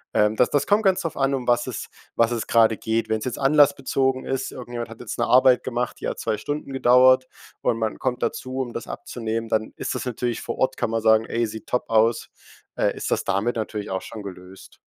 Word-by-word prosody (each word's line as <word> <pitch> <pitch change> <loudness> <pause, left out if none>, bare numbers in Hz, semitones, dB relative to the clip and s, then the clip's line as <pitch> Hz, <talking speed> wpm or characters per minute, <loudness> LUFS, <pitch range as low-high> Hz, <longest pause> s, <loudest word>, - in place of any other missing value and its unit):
Ähm, 105 +1 +3
das 125 - +3
das 145 -1 +1
kommt 205 +1 +3
ganz 190 -2 +3
drauf 165 - -4
an, 135 0 +1
um 125 -2 -5
was 120 0 +2
es 125 - -4 0.3
was 115 0 +3
es 115 -2 -2
grade 115 -1 +4
geht. 110 0 -1
Wenn's 110 -1 -1
jetzt 130 - -3
anlassbezogen 135 -2 +2
ist, 135 0 -2
irgendjemand 120 -2 -6
hat 115 - -11
jetzt 120 - -6
'ne - - +2
Arbeit 130 0 +5
gemacht, 125 -1 -3
die - - -4
hat - - -3
2 110 - -1
Stunden 145 -2 -4
gedauert 130 0 +5 0.3
und 115 - +1
man 110 -1 -2
kommt 125 -1 -2
dazu, 130 +1 -3
um 120 -2 -5
das - - -6
abzunehmen, 115 -1 -4
dann 110 -1 0
ist - - -3
das - - -4
natürlich 120 -1 -2
vor - - -5
Ort 130 0 0
kann - - -1
man 115 0 -1
sagen: 110 0 +4
„Ey, 115 +1 -1
sieht 110 0 -8
top 125 - -2
aus.“ 115 +1 +2 0.5
Äh, - - +1
ist - - -4
das - - +1
damit 105 +5 0
natürlich 110 -2 -4
auch 95 0 -2
schon 105 -2 -9
gelöst. 95 0 -11
120 Hz, 230 wpm, -23 LUFS, 110-130 Hz, 0.5 s, Arbeit